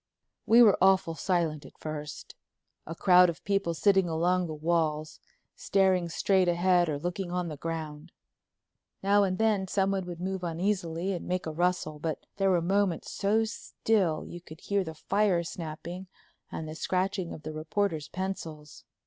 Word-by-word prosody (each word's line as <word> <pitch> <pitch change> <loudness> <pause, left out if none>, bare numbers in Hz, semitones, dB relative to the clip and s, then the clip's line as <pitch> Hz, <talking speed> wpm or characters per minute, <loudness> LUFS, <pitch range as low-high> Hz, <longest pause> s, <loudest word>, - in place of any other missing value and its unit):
We 235 +2 +8
were 210 -4 +5
awful 190 -3 +4
silent 165 -4 -1
at - - -15
first, 150 -2 -7 0.5
a 165 - -5
crowd 180 0 +6
of 165 - -6
people 195 -4 0
sitting 190 0 +3
along 175 +2 +1
the 155 - -5
walls, 155 -1 -1 0.4
staring 190 -3 +2
straight 190 +2 +2
ahead 175 0 +3
or 145 - -1
looking 175 +3 -4
on 180 -1 -2
the 155 - -5
ground. 160 +1 -6 0.9
Now 200 +1 +4
and 185 -1 0
then 215 -4 +1
someone 195 -1 0
would 175 -1 -7
move 190 0 -3
uneasily 175 +1 -1
and 175 - -5
make 185 0 -1
a 160 - -3
rustle, 165 -2 -1
but 155 0 -4
there 195 -1 +2
were 175 -3 +2
moments 190 -1 0
so 215 +3 +1
still 200 -6 -1
you 175 - -9
could 155 -1 -13
hear 200 -1 0
the 160 -2 -7
fire 195 +1 +1
snapping 170 +3 -7 0.4
and 160 - -5
the 155 - -6
scratching 185 +2 -1
of 155 - -9
the 155 - -5
reporters' 155 0 -2
pencils. 165 -6 -6
175 Hz, 165 wpm, -29 LUFS, 160-195 Hz, 0.9 s, We